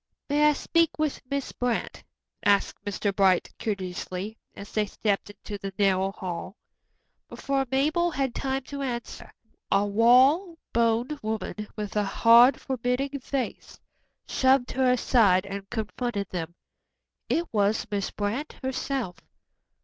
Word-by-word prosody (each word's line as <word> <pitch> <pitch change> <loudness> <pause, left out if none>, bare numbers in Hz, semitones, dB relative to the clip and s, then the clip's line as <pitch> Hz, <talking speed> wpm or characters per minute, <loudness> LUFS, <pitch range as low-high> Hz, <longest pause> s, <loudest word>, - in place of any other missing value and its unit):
"May 295 +1 +4
I - - +3
speak 335 +2 +1
with 305 -2 -1
Miss 280 -1 -2
Brant?" 245 -2 -2 0.4
asked 200 0 +2
Mr. 200 0 -2
Bright 190 -3 +3
courteously, 190 0 -4 0.2
as 200 - -10
they 215 -1 0
stepped 205 -1 -1
into 205 0 -8
the 195 -1 -6
narrow 195 -1 +2
hall. 185 0 -6 0.7
Before 270 -1 -1
Mabel 310 +6 +2
had 270 -6 -1
time 270 0 -2
to 280 +2 -7
answer, 240 -3 -5 0.4
a - - +3
tall, 200 +1 +1 0.6
raw - - -13 0.2
boned 235 +5 +1
woman, 215 -1 -4
with 210 -1 -5
a 210 - +2
hard, 235 +6 +6
forbidding 265 +2 -2
face, 265 -1 -4 0.5
shoved 260 -1 +3
her 260 -1 +2
aside 215 -6 +3
and 195 0 -7
confronted 220 -2 -3
them. 170 -1 -4 0.7
It 335 - +1
was 205 0 +2
Miss 200 -1 -1
Brant 215 +9 -3
herself. 260 -6 -2
225 Hz, 135 wpm, -26 LUFS, 200-270 Hz, 0.7 s, hard